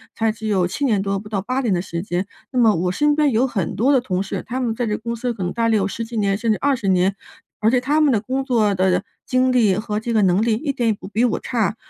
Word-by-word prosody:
才 225 Hz, -1 st, +1 dB
只 220 Hz, 0 st, -9 dB
有 190 Hz, -4 st, +2 dB
7 280 Hz, +10 st, -2 dB
年 210 Hz, -6 st, +2 dB
多， 195 Hz, 0 st, -1 dB
不 210 Hz, -, -11 dB
到 200 Hz, -3 st, -1 dB
8 255 Hz, +6 st, -2 dB
年 230 Hz, -7 st, +1 dB
的 175 Hz, -, 0 dB
时 170 Hz, -3 st, -5 dB
间。 180 Hz, -1 st, -2 dB, 0.3 s
那 255 Hz, -, 0 dB
么 225 Hz, -3 st, +5 dB
我 180 Hz, +2 st, 0 dB
身 295 Hz, +8 st, +2 dB
边 295 Hz, -2 st, +3 dB
有 235 Hz, +4 st, +2 dB
很 195 Hz, -9 st, -3 dB
多 255 Hz, +7 st, +2 dB
的 265 Hz, -, +5 dB
同 190 Hz, -7 st, -2 dB
事， -, -, -5 dB
他 250 Hz, +3 st, -3 dB
们 240 Hz, -3 st, -1 dB
在 245 Hz, -, -1 dB
这 210 Hz, -, 0 dB
公 235 Hz, +1 st, -4 dB
司 240 Hz, +1 st, -2 dB
可 205 Hz, -, -9 dB
能 175 Hz, -, -2 dB
呆 230 Hz, -1 st, 0 dB
了 220 Hz, -, +3 dB
有 200 Hz, -2 st, +1 dB
10 230 Hz, +3 st, -4 dB
几 235 Hz, -, -9 dB
年 200 Hz, -2 st, +1 dB
甚 230 Hz, +1 st, 0 dB
至 215 Hz, -, +1 dB
20 270 Hz, -8 st, 0 dB
年， 190 Hz, +1 st, +2 dB, 0.4 s
而 220 Hz, -, +3 dB
且 255 Hz, -, +3 dB
他 290 Hz, +4 st, +1 dB
们 295 Hz, -3 st, +4 dB
的 210 Hz, -, +1 dB
工 260 Hz, +4 st, -2 dB
作 225 Hz, -6 st, +2 dB
的 185 Hz, 0 st, +1 dB, 0.2 s
经 255 Hz, 0 st, +2 dB
历 220 Hz, -7 st, +3 dB
和 210 Hz, 0 st, -2 dB
这 235 Hz, +1 st, -3 dB
个 215 Hz, -, +3 dB
能 185 Hz, +2 st, +3 dB
力 230 Hz, -1 st, +2 dB
一 280 Hz, +6 st, -1 dB
点 240 Hz, -3 st, 0 dB
也 -, -, +3 dB
不 200 Hz, -, -10 dB
比 220 Hz, +4 st, +1 dB
我 235 Hz, -, 0 dB
差。 225 Hz, -4 st, -1 dB
220 Hz, 305 characters per minute, -21 LUFS, 195-250 Hz, 0.4 s, 么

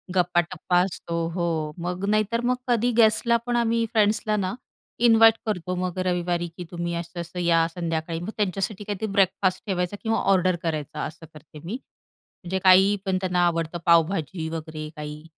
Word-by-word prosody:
गप्पा-टप्पा 175 Hz, 0 st, +1 dB
असतो 170 Hz, -2 st, -5 dB, 0.2 s
हो, 175 Hz, -1 st, -1 dB, 0.4 s
मग 180 Hz, +2 st, -3 dB
नाहीतर 215 Hz, +2 st, +1 dB
मग 250 Hz, 0 st, +2 dB
कधी 240 Hz, 0 st, +2 dB
गेस्टला 230 Hz, +1 st, +4 dB
पण 240 Hz, 0 st, -1 dB
आम्ही 230 Hz, -1 st, +1 dB
फ्रेंड्सला 215 Hz, 0 st, +2 dB
ना 185 Hz, -1 st, -1 dB, 0.5 s
इन्व्हाईट 225 Hz, -1 st, +7 dB
करतो 180 Hz, -3 st, -2 dB
मग 180 Hz, 0 st, -3 dB
रविवारी 175 Hz, -1 st, 0 dB
की 180 Hz, -, -5 dB
"तुम्ही 170 Hz, 0 st, -3 dB
असं-असं 170 Hz, +1 st, -6 dB
या 165 Hz, -1 st, +3 dB
संध्याकाळी," 165 Hz, -1 st, -3 dB
मग 175 Hz, +5 st, -6 dB
त्यांच्यासाठी 195 Hz, 0 st, -2 dB
काहीतरी 205 Hz, +1 st, -3 dB
ब्रेकफास्ट 190 Hz, -1 st, +1 dB
ठेवायचा 180 Hz, +1 st, -1 dB
किंवा 225 Hz, 0 st, +1 dB
ऑर्डर 185 Hz, -1 st, +3 dB
करायचा 155 Hz, -3 st, -3 dB
असं 160 Hz, +1 st, -9 dB
करते 155 Hz, 0 st, -13 dB
मी. 190 Hz, -, -5 dB, 0.7 s
म्हणजे 190 Hz, +2 st, -2 dB
काही 190 Hz, +2 st, +6 dB
पण 190 Hz, -1 st, +1 dB
त्यांना 180 Hz, -1 st, +1 dB
आवडतं 165 Hz, 0 st, -2 dB
पावभाजी 165 Hz, 0 st, +2 dB
वगैरे 155 Hz, -1 st, -6 dB
काही. 150 Hz, 0 st, -7 dB
180 Hz, 155 wpm, -24 LUFS, 170-205 Hz, 0.7 s, इन्व्हाईट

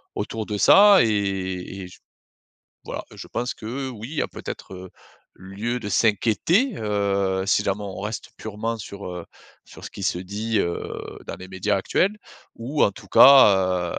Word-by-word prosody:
autour 110 Hz, -1 st, -4 dB
de 105 Hz, -1 st, -4 dB
ça 200 Hz, -, +7 dB
et 95 Hz, -3 st, -2 dB
et 90 Hz, -, -7 dB
j 90 Hz, -, -15 dB, 0.9 s
voilà. -, -, -5 dB
Je -, -, -10 dB
pense 125 Hz, +1 st, -3 dB
que, 130 Hz, +5 st, -5 dB
oui, 115 Hz, -2 st, -8 dB
il -, -, -7 dB
y -, -, 0 dB
a -, -, -2 dB
peut-être, -, -, -8 dB
heu, 95 Hz, 0 st, -9 dB, 0.5 s
lieu 100 Hz, +6 st, -4 dB
de 105 Hz, -, -5 dB
s'inquiéter, 115 Hz, -, +2 dB
heu, 100 Hz, -3 st, 0 dB
si 100 Hz, -, +2 dB
jamais 100 Hz, +1 st, -2 dB
on 95 Hz, -2 st, -7 dB
reste 105 Hz, +2 st, -5 dB
purement 110 Hz, +2 st, -4 dB
sur, 100 Hz, -1 st, -9 dB
heu, 90 Hz, -2 st, -7 dB, 0.4 s
sur -, -, -14 dB
ce -, -, -8 dB
qui 100 Hz, -, -9 dB
se 90 Hz, -, 0 dB
dit, 105 Hz, +5 st, -3 dB
heu, 85 Hz, -2 st, -1 dB, 0.5 s
dans -, -, -5 dB
les 95 Hz, -, -11 dB
médias 95 Hz, +2 st, -1 dB
actuels, 190 Hz, -, 0 dB, 0.4 s
ou 130 Hz, +6 st, -3 dB
en -, -, +3 dB
tout 100 Hz, -, -14 dB
cas, 95 Hz, -9 st, +6 dB
105 Hz, 175 wpm, -23 LUFS, 95-115 Hz, 0.9 s, ça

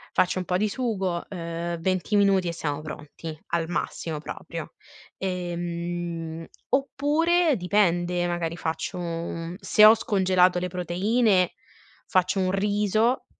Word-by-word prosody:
faccio 185 Hz, +1 st, +2 dB
un 180 Hz, -, -4 dB
po' 180 Hz, -, +1 dB
di 215 Hz, +3 st, +1 dB
sugo, 195 Hz, -8 st, -2 dB
uhm, 170 Hz, -1 st, -4 dB
20 185 Hz, +4 st, 0 dB
minuti 195 Hz, -3 st, +4 dB
e 170 Hz, -, -1 dB
siamo 150 Hz, -3 st, -3 dB
pronti, 155 Hz, +1 st, -8 dB
al 165 Hz, -1 st, -1 dB
massimo 165 Hz, -2 st, -3 dB
proprio, 150 Hz, -, -7 dB, 0.4 s
ehm, 175 Hz, -2 st, -4 dB, 0.2 s
oppure 300 Hz, +4 st, +2 dB
dipende, 175 Hz, -2 st, +1 dB
magari 170 Hz, -1 st, -2 dB
faccio 165 Hz, +3 st, -3 dB
un 170 Hz, 0 st, -4 dB
se 210 Hz, +1 st, +5 dB
ho 215 Hz, -, +10 dB
scongelato 185 Hz, -5 st, +3 dB
le 180 Hz, -, -2 dB
proteine 185 Hz, +3 st, +2 dB, 0.6 s
faccio 185 Hz, +1 st, +2 dB
un 185 Hz, -1 st, +1 dB
riso, 210 Hz, +4 st, +1 dB
180 Hz, 125 wpm, -26 LUFS, 170-205 Hz, 0.6 s, ho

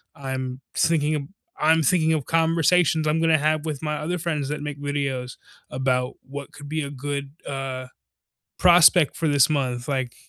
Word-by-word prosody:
I'm 130 Hz, -1 st, -5 dB
sinking 155 Hz, -2 st, +2 dB
of 145 Hz, -, -2 dB, 0.4 s
I'm 160 Hz, +1 st, +3 dB
thinking 160 Hz, +1 st, +3 dB
of 150 Hz, -4 st, -1 dB
conversations 165 Hz, 0 st, +2 dB
I'm 155 Hz, +2 st, +1 dB
gonna 165 Hz, -1 st, +4 dB
have 155 Hz, +1 st, 0 dB
with 155 Hz, -2 st, -4 dB
my 150 Hz, -1 st, -2 dB
other 175 Hz, +4 st, -3 dB
friends 155 Hz, -5 st, -2 dB
that 150 Hz, 0 st, -4 dB
make 145 Hz, -1 st, -6 dB
videos 135 Hz, -3 st, -3 dB, 0.4 s
about 125 Hz, 0 st, -1 dB
what 140 Hz, +1 st, -8 dB
could 145 Hz, -, -11 dB
be 155 Hz, +2 st, -2 dB
a 140 Hz, -, -4 dB
good, 140 Hz, 0 st, -5 dB, 0.2 s
uh, 135 Hz, -2 st, -4 dB, 0.7 s
prospect 175 Hz, -3 st, +6 dB
for 165 Hz, -, -1 dB
this 145 Hz, -1 st, +4 dB
month, 125 Hz, -4 st, -1 dB
like, 130 Hz, -3 st, -2 dB
145 Hz, 170 wpm, -23 LUFS, 135-160 Hz, 0.7 s, prospect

